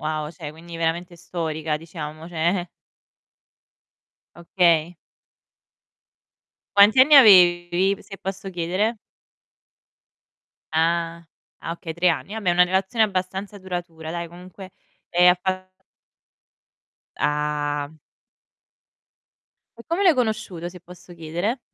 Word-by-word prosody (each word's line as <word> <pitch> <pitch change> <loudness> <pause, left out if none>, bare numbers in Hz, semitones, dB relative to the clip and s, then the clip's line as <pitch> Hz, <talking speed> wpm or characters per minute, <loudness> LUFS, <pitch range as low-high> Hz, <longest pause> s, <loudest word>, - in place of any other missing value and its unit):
wow, 155 -1 -3
cioè 160 -3 -8
quindi 165 +2 -11
veramente 170 +1 -2
storica, 160 -3 -3
diciamo, 155 0 -8
cioè 175 +2 -1 1.7
Okay. 170 -1 +1 1.8
Quanti 205 +5 +7
anni 295 +4 +6
avevi, 180 -3 +6
se 195 - -11
posso 195 0 -6
chiedere? 185 +6 -1 1.8
Ah, 170 +1 0 0.4
ah - - -6
okay, 165 -1 -7
3 180 +2 +2
anni. 190 +5 -2
Vabbè, 205 -5 0
una 180 +1 +5
relazione 190 +5 +1
abbastanza 190 +1 -4
duratura, 175 -4 -6
dai, 170 0 -4
comunque, 180 +2 -12 0.4
e 175 +1 +4
hai 180 - +6
fa 185 0 -3 1.5
Ah. 150 -1 -1 1.9
E - - -13
come 340 +4 -1
l'hai 360 - +6
conosciuto, 215 - -2
se 180 0 -12
posso 180 0 -14
chiedere? 175 - -3
175 Hz, 100 wpm, -23 LUFS, 165-190 Hz, 1.9 s, Quanti